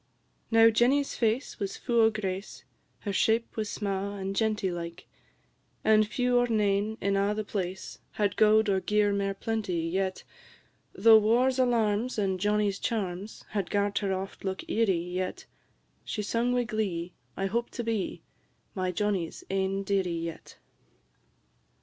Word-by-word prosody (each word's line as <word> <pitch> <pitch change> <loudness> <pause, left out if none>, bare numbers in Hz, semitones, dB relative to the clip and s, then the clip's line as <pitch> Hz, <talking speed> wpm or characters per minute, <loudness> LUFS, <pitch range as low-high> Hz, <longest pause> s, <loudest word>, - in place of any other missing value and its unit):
Now 225 0 +6
Jenny's 265 +5 +2
face 230 +3 -1
was 195 -1 -3
fu' 235 -1 +1
o' 220 - +6
grace, 195 -2 -5 0.4
Her 200 - -3
shape 225 +4 +1
was 215 -2 -2
sma' 200 0 -3
and 195 0 -4
genty 215 -3 0
like, 170 0 -6 0.8
And 215 -1 +4
few 245 +1 +2
or 245 - +2
nane 210 -1 +1
in 200 0 0
a' 200 +1 +1
the 215 - -2
place, 190 -3 -5
Had 205 -2 0
gowd 215 0 +5
or 195 -1 +2
gear 210 +1 +2
mair 195 0 -1
plenty, 205 -5 -2
yet 185 +3 -2 0.7
Though 220 +2 +7
war's 245 +5 +2
alarms, 235 -1 +1
and 190 -3 0
Johnnie's 205 0 +1
charms, 205 -3 -3
Had 200 -4 -2
gart 205 0 +1
her 200 -2 -1
oft 190 +1 -4
look 190 -1 -4
eerie, 215 -5 +2
yet 180 +2 -4 0.6
She 210 - -3
sung 235 +4 0
wi' 245 0 +2
glee, 190 -6 -3 0.2
"I 195 - -1
hope 235 +5 -1
to 240 - -5
be 225 -4 -2 0.5
My 185 -1 -1
Johnnie's 190 -3 -2
ain 195 0 0
dearie 195 -2 0
yet. 165 0 -7
205 Hz, 150 wpm, -28 LUFS, 190-220 Hz, 0.8 s, Though